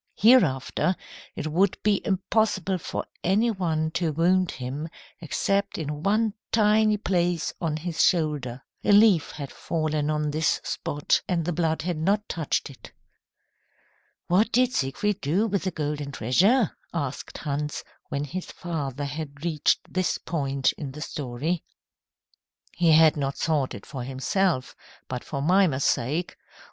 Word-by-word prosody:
Hereafter 185 - +4 0.4
it - - -4
would 175 +5 +2
be 205 -1 +2
impossible 190 -1 0
for - - -4 0.2
any 210 +6 +3
one 160 -6 -1
to 170 -1 0
wound 180 +3 +2
him 135 +5 -5 0.3
except 195 +4 -1
in 150 -2 -4
one 215 +4 +2 0.2
tiny 215 -1 +4
place 175 -4 0
on 160 -3 -1
his 165 +1 -1
shoulder. 150 -8 +1 0.2
A 205 - +4
leaf 200 -6 +6
had 140 -3 -7
fallen 155 -2 -1
on 150 -1 0
this 155 +2 +1
spot, 145 0 0
and 170 -3 0
the 175 - -1
blood 160 -1 0
had 175 -1 -2
not 200 +6 +1
touched 160 -4 -2
it. 130 - -14 1.3
"What 205 +6 +3
did 255 0 +3
Siegfried 180 +9 -1
do 170 +10 +1
with 200 -3 -1
the 185 - 0
golden 150 -2 -3
treasure?" 190 - +3 0.2
asked 140 -6 -4
Hans, 150 0 -3 0.3
when 140 -2 -2
his 175 +6 -5
father 145 -5 -4
had 145 +1 -6
reached 160 -3 +2
this 185 -1 0
point 140 -4 0
in 140 -4 -5
the 150 - -8
story. 145 +5 -3 1.1
"He 170 -2 +4
had 160 0 +6
not 140 -2 -2
sought 150 -5 0
it 100 - -10
for 135 -3 -6
himself, 135 +4 0 0.3
but 125 -1 -4
for 140 -2 -4
Mimer's 170 -5 +3
sake. 150 +9 0
160 Hz, 145 wpm, -26 LUFS, 145-190 Hz, 1.3 s, leaf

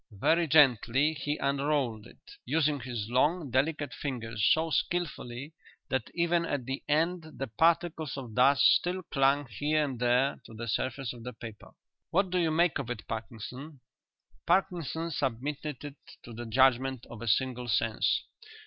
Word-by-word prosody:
Very 165 +8 +3
gently 140 0 +4
he 145 0 -3
unrolled 140 -5 -1
it, - - -18
using 150 +1 +1
his 120 -4 -5
long, 145 +5 +1
delicate 145 +3 0
fingers 115 -6 -4
so 160 +1 +2
skilfully 145 -4 -2 0.4
that 130 -4 -1
even 170 0 +2
at 145 -6 -3
the 135 +2 -4
end 160 +1 0
the 135 - -2
particles 160 +3 +1
of 125 -5 -7
dust 130 +2 +4
still 185 +1 +3
clung 140 -1 +2
here 150 +7 0
and 130 -4 -5
there 125 +3 +2
to 110 - -12
the 115 +1 -6
surface 130 +3 -2
of 120 -2 -11
the 125 +1 -6
paper. 110 -1 -11 0.4
"What 190 +1 +1
do 180 - +1
you 165 -2 +2
make 165 0 +2
of 130 -4 -5
it, 120 -3 -6
Parkinson?" 120 +6 -7 0.7
Parkinson 170 -3 0
submitted 140 +1 -3
it 145 0 -8 0.3
to 120 - -10
the 120 +1 -7
judgment 130 +1 +2
of 120 - -11
a 120 - -5
single 125 +3 0
sense. 115 0 +1
135 Hz, 160 wpm, -29 LUFS, 120-155 Hz, 0.7 s, gently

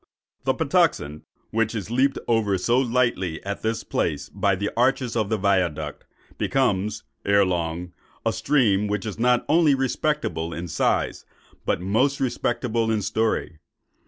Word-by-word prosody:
The - - +2
Patuxent, 75 +2 +1 0.3
which 115 +1 0
is 105 0 -4
leaped 135 +3 +2
over 110 -4 +2
so 120 +7 +2
lightly 120 -9 0
at 100 0 -4
this 110 0 -1
place 70 -1 -2
by 100 -1 +1
the 100 +3 -2
arches 125 0 +1
of 110 -3 0
the 110 - +1
Viaduct, 90 -7 0 0.3
becomes, 105 -5 0 0.2
ere 100 0 +4
long, 85 -1 -2 0.3
a - - +2
stream 105 -8 +2
which 105 0 -2
is 105 0 -5
not 125 +1 +3
only 155 -2 +4
respectable 135 - -1
in 85 +1 -5
size, 80 - 0 0.4
but - - +1
most 125 +9 +1
respectable 120 -3 0
in 110 -2 0
story. 110 -5 -1
110 Hz, 145 wpm, -24 LUFS, 95-125 Hz, 0.4 s, ere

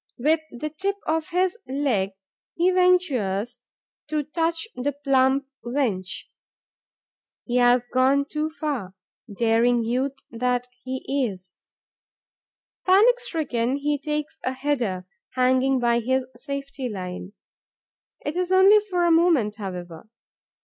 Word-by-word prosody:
With 310 +6 +3
the 300 +5 -5
tip 390 +6 -2
of 320 0 -1
his 370 +4 0
leg, 255 -8 0 0.4
he 350 +2 +3
ventures 255 - +2 0.5
to 305 -1 -1
touch 330 +5 -1
the 280 +3 -2
plump 275 -1 +2 0.2
wench. 235 -8 -1 1.2
He 245 0 0
has 245 0 +4
gone 260 +3 +2
too 305 +2 -2
far, 285 - -4 0.4
daring 230 +3 +2
youth 255 +4 -1 0.2
that 245 +1 -1 0.2
he 260 +1 -1
is! 185 -2 -10 1.2
Panic 435 +7 +5
stricken, 275 - -1
he 290 +1 -1
takes 300 +1 -3
a 255 - -1
header, 250 -9 -1 0.3
hanging 260 +1 +3
by 235 -1 +2
his 260 +2 0
safety 275 -2 -5
line. 185 -1 -6 0.9
It 295 - -2
is 360 0 -1
only 385 +3 +7
for 370 -4 -1
a 340 - +4
moment, 320 -11 +3
however. 180 -2 -7
265 Hz, 120 wpm, -24 LUFS, 235-310 Hz, 1.2 s, only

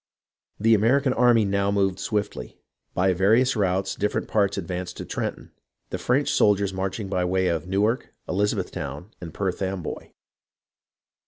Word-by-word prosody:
The 115 +2 +4
American 130 +6 +3
army 120 -3 +4
now 100 0 +1
moved 95 -2 +1
swiftly. 100 - -3 0.4
By 95 +1 +3
various 110 +9 +3
routes 95 -2 0
different 105 +1 -1
parts 100 -2 +1
advanced 90 -1 -4
to - - -6
Trenton, - - -4 0.4
the - - -3
French 135 +4 +1
soldiers 100 -2 +3
marching 95 +2 -3
by 95 -2 -1
the 90 - 0
way 95 0 +1
of 85 0 -2
Newark, 105 +6 0 0.2
Elizabethtown, 90 -4 -2
and 85 -2 -7
Perth 95 +2 -3
Amboy. 95 -3 -4
100 Hz, 145 wpm, -25 LUFS, 95-105 Hz, 0.4 s, The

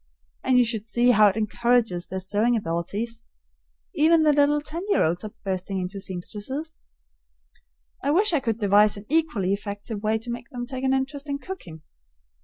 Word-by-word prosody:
And 255 -1 +3
you 250 - +5
should 225 -2 -3
see 240 +2 +3
how 215 -2 +6
it 200 +1 +1
encourages 220 -4 +1
their 190 - -4
sewing 210 +5 +1
ability. 195 +3 -2 0.9
Even 315 +2 +4
the 300 -1 +5
little 290 +1 +3
ten 305 +3 -6
year - - +3
olds 170 +3 0
are 215 - -6
bursting 190 0 -2
into 185 +2 -4
seamstresses. 210 - -5 1.2
I 280 - -1
wish 370 +5 +4
I 310 - +3
could 230 -5 -2
devise 205 0 +4
an 200 - -10
equally 295 - +1
effective 205 +1 -5
way 215 +1 +1
to 230 +2 -6
make 240 0 -7
them 245 -3 -5
take 260 +1 -6
an 265 0 +2
interest 280 +2 -3
in 280 - -1
cooking. 180 - -9
230 Hz, 180 wpm, -25 LUFS, 200-280 Hz, 1.2 s, how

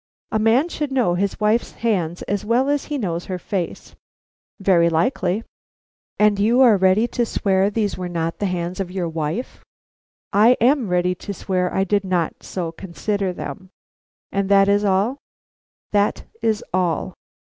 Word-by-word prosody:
"A 220 - +1
man 230 +8 +3
should 295 -4 -4
know 250 -9 +2
his 195 +2 -1
wife's 215 +2 +1
hands 180 -7 -1
as 200 -1 -2
well 245 +5 +2
as 290 -1 0
he 295 - -3
knows 175 -8 -3
her 185 - -4
face." 180 -1 -4 0.7
"Very 180 -4 +4
likely." 180 +3 0 0.7
"And 210 -1 +3
you 230 +5 +3
are 240 -5 +7
ready 190 +4 +3
to 240 - 0
swear 195 -3 +1
these 210 -2 -2
were 180 -1 -4
not 165 -1 -3
the 205 - 0
hands 180 0 -3
of 190 -2 -2
your 180 -2 -2
wife?" 160 +8 -4 0.7
"I 225 +5 +5
am 250 0 +3
ready 180 0 +1
to 200 +2 -7
swear 180 -1 -1
I 190 - +1
did 200 +1 +1
not 180 -4 -1
so 170 -3 -4
consider 190 +3 -3
them." 190 +1 -7 0.6
"And 200 0 -1
that 195 0 +5
is 205 +1 +3
all?" 205 +7 +1 0.7
"That 205 0 +1 0.2
is 220 -2 0
all." 180 -3 0
195 Hz, 165 wpm, -21 LUFS, 180-220 Hz, 0.7 s, are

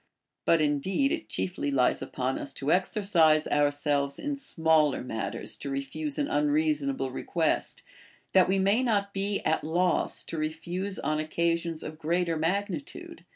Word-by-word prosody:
But 165 -1 +4
indeed 165 - +1
it 330 -1 -3
chiefly 180 -6 -2
lies 130 -3 +2
upon 130 0 -2
us 140 - -4
to 140 +3 -2
exer 190 +3 0
cise 160 -6 +4
ourselves 145 -1 +1
in 290 0 -3
smaller 160 - +2
matters 110 -3 -4
to 140 - -5
refuse 140 - -3
an 290 - +1
unreasonal)k' 295 - 0
request, 160 +3 -1 0.5
that 185 -1 +6
we 195 - +3
may 200 +5 +3
not 205 -5 0
be 200 +1 -1
at 160 - 0
loss 175 +3 +1
how - - -20
to 165 - -4
refuse 175 +5 -3
on 155 +1 -1
occa 165 +2 +1
sions 165 -1 -5
of 155 0 -7
greater 170 +1 0
magnitude. 170 0 -3
165 Hz, 155 wpm, -28 LUFS, 150-200 Hz, 0.5 s, that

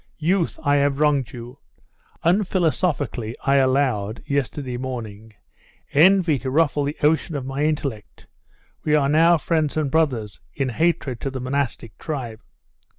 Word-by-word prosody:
Youth! 170 +2 0
I 145 -1 +3
have 140 0 +1
wronged 145 -5 +2
you. 120 +2 -10 0.7
Unphilosophically 165 - 0
I 140 0 +3
allowed, 130 -6 +1
yesterday 140 -2 -2
morning, 110 -4 -7 0.6
envy 170 -1 +5
to 130 - -4
ruffle 145 0 +2
the 145 +2 -4
ocean 160 +1 +2
of 135 -3 -4
my 135 +2 -2
intellect. 140 -8 -4 0.6
We 150 - +2
are 145 -2 +3
now 165 +4 +5
friends 155 -1 -1
and 150 -3 0
brothers, 125 -10 0
in 135 -2 -1
hatred 135 -3 -1
to 135 - -2
the 130 -1 -5
monastic 130 -3 -3
tribe. 125 -8 -5
140 Hz, 140 wpm, -22 LUFS, 125-155 Hz, 0.7 s, envy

